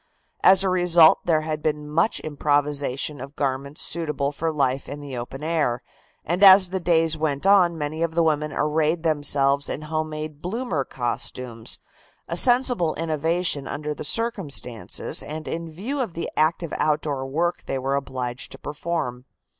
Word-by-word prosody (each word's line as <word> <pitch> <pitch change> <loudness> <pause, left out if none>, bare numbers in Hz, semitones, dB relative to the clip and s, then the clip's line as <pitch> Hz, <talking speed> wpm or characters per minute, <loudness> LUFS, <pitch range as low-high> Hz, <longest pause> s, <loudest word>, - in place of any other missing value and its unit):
As 190 0 +7
a 190 - +1
result 175 -3 +6
there 160 -2 +3
had 155 -1 -3
been 150 -1 -2
much 165 +8 +1
improvisation 145 -2 -1
of 140 +2 -9
garments 140 +1 -2
suitable 150 -4 -2
for 160 +2 -2
life 135 -3 -1
in 145 - -6
the 140 -3 -7
open 125 +4 -6
air, 155 -7 0 0.4
and 175 +4 -1
as 190 -2 +8
the 190 - -1
days 165 -2 +2
went 150 -1 -2
on 185 -4 +5
many 155 +1 -4
of 165 -1 -1
the 170 - +3
women 150 -1 0
arrayed 155 +3 0
themselves 145 -3 +2
in 155 - -4
home 155 0 -2
made 155 -1 -6
bloomer 185 - -2
costumes, 120 -1 -3 0.5
a 170 - -3
sensible 245 -5 +3
innovation 160 -1 -1
under 150 +1 -3
the - - -7
circumstances 155 - -1
and 155 +1 -7
in 165 0 -4
view 215 - -5
of 230 -10 -3
the 170 - -4
active 160 +1 +1
outdoor 150 -3 -1
work 175 +6 -1
they 135 - -1
were 135 +1 -2
obliged 130 -3 -4
to - - -9
perform. 145 -5 -4
155 Hz, 160 wpm, -24 LUFS, 140-170 Hz, 0.5 s, as